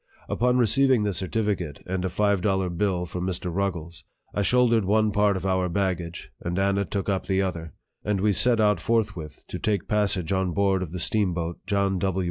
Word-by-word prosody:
Upon 125 +1 +1
receiving 125 0 +3
this 100 -4 -1
certificate, 95 -6 -2
and 90 0 -3
a 95 - -1
five 100 +1 +1
dollar 95 -2 0
bill 90 0 -1
from 90 +1 -5
Mr. 90 -1 -3
Ruggles, 85 -3 -3 0.3
I 105 - 0
shouldered 115 0 +3
one 105 +2 +2
part 105 -1 +2
of 95 - -6
our 95 -1 +1
bag 95 -1 0
gage, 85 0 -8
and 85 +1 -3
Anna 100 +1 +1
took 100 +2 -3
up 95 -2 -1
the 95 0 +1
other, 85 -4 -5 0.3
and 105 -2 0
we 105 +1 +2
set 120 +3 +4
out 105 -4 +3
forthwith 105 -8 -2
to - - -6
take 105 -4 -1
passage 100 -5 0
on 95 -2 0
board 100 -1 +1
of 90 -4 -5
the 90 - -5
steamboat 85 -4 0
John 100 -2 +1
W. 95 0 -1
95 Hz, 200 wpm, -25 LUFS, 90-105 Hz, 0.3 s, set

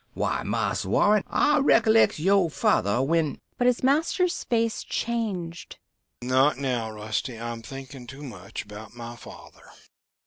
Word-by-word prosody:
Why, - - -1
Marse - - -1
Warren, 210 -1 +3
I 295 0 +3
recollects 225 -5 +4
yoh 190 +2 +3
father 120 -4 +1
when...." 160 +1 +1 0.2
But 245 - +3
his 250 0 +1
master's 325 +6 +1
face 230 -1 0
changed. 195 -8 -3 0.5
"Not 130 +4 +3
now, 125 -5 -2
Rusty. 110 +3 -4
I'm 115 0 -5
thinking 135 +1 -9
too 135 +5 -10
much 100 -8 -7
about 105 +2 -11
my 120 0 -8
father. - - -14
145 Hz, 135 wpm, -26 LUFS, -, 0.5 s, recollects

